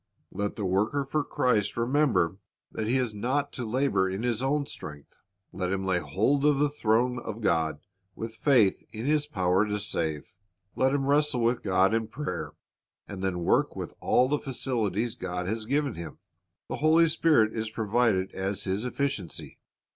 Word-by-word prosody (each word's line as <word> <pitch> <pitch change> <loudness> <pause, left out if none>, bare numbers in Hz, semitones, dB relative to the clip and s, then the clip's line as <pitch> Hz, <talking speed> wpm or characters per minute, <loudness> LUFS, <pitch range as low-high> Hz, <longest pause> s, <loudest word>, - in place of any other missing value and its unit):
Let 100 +1 -3
the 105 - -3
worker 105 +10 +1
for 150 +2 0
Christ 125 -10 0
remember 115 - +2 0.3
that 110 - -3
he 125 +3 +2
is 125 -4 0
not 130 +7 -1
to 125 - -4
labor 110 -5 +1
in 95 +4 -4
his 120 -2 0
own 140 +2 +1
strength. 75 - -10 0.3
Let 90 -1 -2
him 95 0 -1
lay 95 -2 +2
hold 100 - +1
of 150 -1 +4
the 145 +1 +2
throne 120 -1 +1
of 110 -1 -6
God 80 -6 +1 0.4
with 115 0 -5
faith 115 -6 +3
in 110 +2 -6
His 150 0 +2
power 95 -5 +2
to 105 0 -1
save. 80 -7 -3 0.4
Let 130 0 +2
him 135 -1 0
wrestle 145 -2 +2
with 120 +1 +1
God 95 +1 +3
in 115 -1 0
prayer, 150 +7 -5 0.5
and 95 -2 -7
then 90 -2 -1
work - - +2
with - - -6
all 125 - +3
the 145 +2 0
facilities 120 -4 -1
God 90 -1 -4
has 110 +2 -2
given 140 0 +1
him. 85 -4 -8 0.5
The - - -4
Holy 160 +2 +5
Spirit 150 -9 +3
is 110 -1 -2
provided 110 -3 +1
as 95 +1 -2
his 100 +4 -1
efficiency. 125 - -3
110 Hz, 175 wpm, -28 LUFS, 95-135 Hz, 0.5 s, Holy